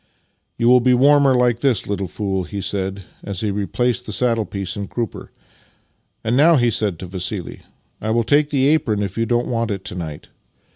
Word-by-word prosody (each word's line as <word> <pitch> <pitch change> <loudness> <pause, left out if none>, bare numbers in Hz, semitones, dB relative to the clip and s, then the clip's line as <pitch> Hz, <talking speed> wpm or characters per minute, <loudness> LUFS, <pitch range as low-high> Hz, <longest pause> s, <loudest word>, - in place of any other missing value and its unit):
" - - -49
You 115 - +1
will 125 +1 +7
be 125 +1 +3
warmer 140 +1 +5
like 120 -2 +2
this, 125 -6 +1
little 100 -2 -3
fool," 95 0 -2
he 100 - -6
said 95 0 -3 0.2
as 100 -3 -4
he 105 -2 -1
replaced 120 +5 -1
the - - -4
saddle 115 +1 +1
piece 95 -1 -4
and 100 -2 -5
crupper. 120 -2 -5 0.5
" - - -45
And 115 +2 0
now," 160 +5 +6
he 120 -4 +3
added 105 -5 0
to - - -5
Vassili, 90 +1 -5 0.2
" - - -41
I 110 - -3
will 115 +1 +2
take 145 +5 +2
the 135 -3 +1
apron 110 -10 +1
if 100 -2 -4
you 115 0 -1
don't 120 +1 +1
want 115 -1 -1
it 100 -2 -4
to - - -3
night. 80 -5 -7
110 Hz, 220 wpm, -20 LUFS, 100-125 Hz, 0.5 s, will